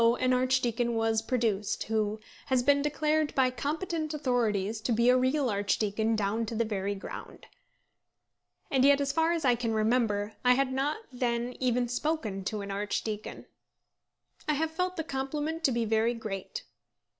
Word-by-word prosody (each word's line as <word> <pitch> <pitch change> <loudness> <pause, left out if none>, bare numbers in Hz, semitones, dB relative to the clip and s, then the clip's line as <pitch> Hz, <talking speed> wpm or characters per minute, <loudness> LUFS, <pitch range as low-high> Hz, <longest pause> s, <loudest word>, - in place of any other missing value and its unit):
an 255 0 +2
archdeacon 250 -2 +1
was 225 -1 +1
produced, 225 -4 -1
who 215 -1 -1 0.3
has 260 -2 +2
been 280 +1 +4
declared 300 +1 0
by 260 -1 +3
competent 310 +3 -3
authorities 225 -6 0
to 240 - -1
be 235 +2 +4
a 250 - +6
real 260 +2 +2
archdeacon 210 +1 0
down 215 +2 0
to 225 +1 -4
the 230 +1 +1
very 200 -2 -2
ground. 195 - -9 1.3
And 265 -2 +3
yet, 280 0 +6
as 280 -1 0
far 325 +2 +2
as 335 -4 -1
I 250 - +5
can 230 -2 -1
remember, 215 -2 +1
I 250 0 +5
had 265 0 +1
not 275 +3 0 0.2
then 245 0 -1
even 250 -1 +1
spoken 245 -6 -2
to 210 +1 -2
an 200 0 -5
archdeacon. 210 +1 -3 1.0
I - - +4
have 320 +2 -1
felt 365 +2 -2
the 320 - -1
compliment 300 +3 -3
to 270 - +4
be 235 -1 0
very 225 +2 +2
great. 205 -4 -5
245 Hz, 165 wpm, -29 LUFS, 220-280 Hz, 1.3 s, a